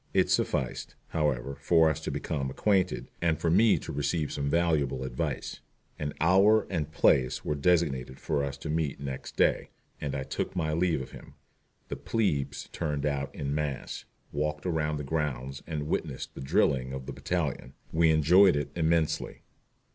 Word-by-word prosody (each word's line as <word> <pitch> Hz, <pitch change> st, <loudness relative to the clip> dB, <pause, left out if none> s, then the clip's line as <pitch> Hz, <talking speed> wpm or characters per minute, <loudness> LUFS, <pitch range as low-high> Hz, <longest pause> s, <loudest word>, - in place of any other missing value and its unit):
It -, -, +3 dB
sufficed, 65 Hz, -, -1 dB
however, 70 Hz, -4 st, -1 dB
for 80 Hz, +2 st, +5 dB
us 80 Hz, -3 st, 0 dB
to -, -, -4 dB
become 70 Hz, -3 st, -2 dB
acquainted, 90 Hz, -, 0 dB
and 80 Hz, -3 st, +1 dB
for 85 Hz, -, +1 dB
me 105 Hz, +5 st, +5 dB
to -, -, -6 dB
receive 75 Hz, +2 st, -1 dB
some 70 Hz, -1 st, -2 dB
valuable 75 Hz, -6 st, +1 dB
advice. 65 Hz, -2 st, -3 dB, 0.4 s
An 75 Hz, -1 st, -3 dB
hour 100 Hz, +6 st, +5 dB
and 75 Hz, -4 st, -2 dB
place 65 Hz, -4 st, +2 dB
were -, -, 0 dB
designated 70 Hz, -5 st, +1 dB
for 75 Hz, -3 st, -1 dB
us 70 Hz, 0 st, -3 dB
to 75 Hz, -, -7 dB
meet 75 Hz, -4 st, -1 dB
next 70 Hz, -2 st, -6 dB
day, -, -, +2 dB, 0.3 s
and 70 Hz, -2 st, -2 dB
I 65 Hz, -, -2 dB
took 95 Hz, -, -4 dB
my 80 Hz, -3 st, 0 dB
leave 85 Hz, -4 st, +1 dB
of -, -, -12 dB
him. -, -, -12 dB, 0.5 s
The -, -, -4 dB
"plebes" 70 Hz, -11 st, -1 dB
turned 75 Hz, -4 st, -2 dB
out 70 Hz, -2 st, -1 dB
en 70 Hz, 0 st, -2 dB
masse, 75 Hz, -3 st, -3 dB, 0.3 s
walked 75 Hz, +2 st, -2 dB
around 75 Hz, -3 st, 0 dB
the 75 Hz, -, -4 dB
grounds 70 Hz, -3 st, -2 dB
and 75 Hz, -2 st, -3 dB
witnessed -, -, -3 dB
the -, -, -8 dB
drilling 65 Hz, -1 st, +1 dB
of 65 Hz, -1 st, -5 dB
the 70 Hz, -, -6 dB
battalion. 70 Hz, -2 st, -2 dB, 0.2 s
We 80 Hz, 0 st, +4 dB
enjoyed 85 Hz, +4 st, +6 dB
it 75 Hz, -, -2 dB
immensely. 80 Hz, -1 st, 0 dB
75 Hz, 170 wpm, -29 LUFS, 70-80 Hz, 0.5 s, enjoyed